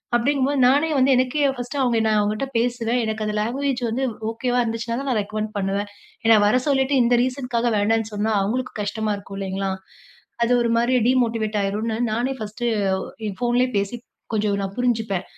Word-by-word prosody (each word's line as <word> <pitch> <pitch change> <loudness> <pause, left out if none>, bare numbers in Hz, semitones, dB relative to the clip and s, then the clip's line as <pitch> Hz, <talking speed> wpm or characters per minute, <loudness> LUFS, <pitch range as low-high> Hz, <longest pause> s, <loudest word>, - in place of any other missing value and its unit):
அப்டடீங்கும் 265 +2 +2
போது 285 -2 0
நானே 290 +5 +3
வந்து 265 +1 +4
எனக்கே 260 +3 +1
பர்ஸ்ட் 245 +4 -5
அவுங்க 235 -2 +2
நான் 215 -1 +3
அவுங்கட்ட 215 +6 -1
பேசுறேன். 240 0 0
எனக்கு 220 0 -2
அந்த 210 0 -2
லாங்குவேஜ் 255 +3 -1
வந்து 245 +4 -1 0.3
ஓகேவா 245 +1 -1
இருந்துச்சுன்னா 230 +1 -3
தான், 275 - -3
நான் 220 - +1
ரெகமெண்ட் 215 +1 -4
பண்ணுவேன். 200 +1 -1 0.4
ஏன்னா 225 -1 +7
வர 250 +4 +3
சொல்லிட்டு 275 0 +2
இந்த 240 0 +3
ரீசன்க்காக 250 -2 -1
வேண்டான்னு 220 +2 +1
சொன்னா 210 +2 0
அவுங்களுக்கும் 240 +4 -2
கஷ்டமா 215 +1 -2
இருக்கும் 195 0 -9
இல்லைங்களா. 195 0 -2 0.7
அது 235 - +1
ஒரு 235 - +1
மாரி 240 +2 +2
டீமோட்டிவேட் 225 -4 +1
ஆயிருன்னு 220 +3 -2
நானே 245 +4 0
ஃபஸ்ட்டு, 215 +3 -5 0.6
என் 195 - -7
ஃபோன்லேயே 245 +1 +2
பேசி 200 +4 -2 0.4
கொஞ்சம் 205 -1 +1
நான் 195 0 -4
புரிஞ்சுப்பேன். 220 -6 0
230 Hz, 170 wpm, -22 LUFS, 210-250 Hz, 0.7 s, ஏன்னா